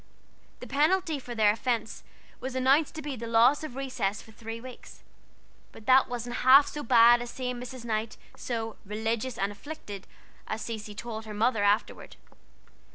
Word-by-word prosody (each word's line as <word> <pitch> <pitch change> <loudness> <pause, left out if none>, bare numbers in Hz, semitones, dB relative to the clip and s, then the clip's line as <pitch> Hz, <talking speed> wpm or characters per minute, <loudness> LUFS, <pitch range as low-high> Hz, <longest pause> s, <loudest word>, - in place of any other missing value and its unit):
The - - -6
penalty 310 +2 +1
for 245 -2 -8
their 215 -2 +5
offense 230 0 -2 0.4
was 260 0 -5
announced 270 +5 +3
to 310 - -6
be 285 -2 -4
the 230 -1 -6
loss 235 +6 +4
of 305 -5 -7
recess 255 -7 -2
for 220 - -14
three 225 +1 -7
weeks; 255 +1 -12 0.7
but 215 - -14
that 260 0 +5
wasn't 240 0 -4
half 270 +3 +7
so 295 - -6
bad 235 -1 +6
as 240 - -6
seeing 250 0 -4
Mrs. 250 -1 -8
Knight 220 -1 -2 0.2
so 225 -2 -4
"religious 220 +4 -3
and 195 +1 -1
afflicted," 205 -4 -9 0.4
as 220 - -4
Cecy 215 -2 -6
told 220 0 -6
her 210 -1 -7
mother 220 0 +1
afterward. 205 +2 0
235 Hz, 165 wpm, -28 LUFS, 220-260 Hz, 0.7 s, half